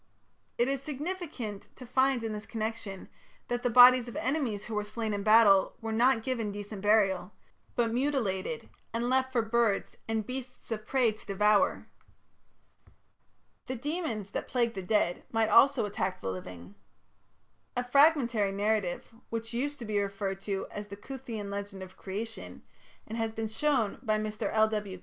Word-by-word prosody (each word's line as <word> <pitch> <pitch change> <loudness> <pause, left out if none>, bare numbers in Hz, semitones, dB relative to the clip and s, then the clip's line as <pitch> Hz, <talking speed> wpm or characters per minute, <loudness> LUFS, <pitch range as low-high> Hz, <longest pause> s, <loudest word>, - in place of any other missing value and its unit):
It 240 - +3
is 275 -1 -1
significant 290 - -5
to 255 - -10
find 260 0 +2
in 225 -1 -2
this 210 0 -7
connection 220 -3 -4 0.4
that 245 0 -1
the 245 - +1
bodies 250 +1 +8
of 240 - -8
enemies 250 -6 -1
who 225 - -6
were 210 0 0
slain 215 +1 -3
in 200 - -2
battle 215 -2 +5
were 225 0 -4
not 230 +1 +3
given 230 -5 -2
decent 205 0 -7
burial, 195 -3 +2 0.4
but 230 -2 +1
mutilated 235 -4 -1 0.3
and 240 +2 0
left 260 0 +2
for 240 -3 +2
birds 225 -2 +1
and 220 -1 -1
beasts 255 0 -7
of 215 -1 -4
prey 255 -4 +3
to 215 - -13
devour. 210 +1 +2 1.8
The 260 - -3
demons 250 - -3
that - - -4
plagued 235 -2 +1
the 190 - -4
dead 185 -2 +1
might 225 -1 +2
also 270 +2 +6
attack 190 -2 -2
the 95 - -3
living. 90 0 -8 1.0
A 245 - +1
fragmentary 245 -6 +4
narrative, 205 -1 -1 0.2
which 230 0 -4
used 285 +5 -2
to 240 - -7
be 210 -1 0
referred 195 -1 -3
to 195 -1 -3
as 205 0 -6
the 200 0 -9
"Cuthean 225 -4 -6
Legend 200 -1 -5
of 185 - -12
Creation", 220 +4 -7 0.4
and 225 +2 -5
has 225 -1 -1
been 225 0 -3
shown 230 -2 0
by 215 -4 +1
Mr. 215 +1 -3
L.W. 215 -4 +1
220 Hz, 165 wpm, -30 LUFS, 205-245 Hz, 1.8 s, bodies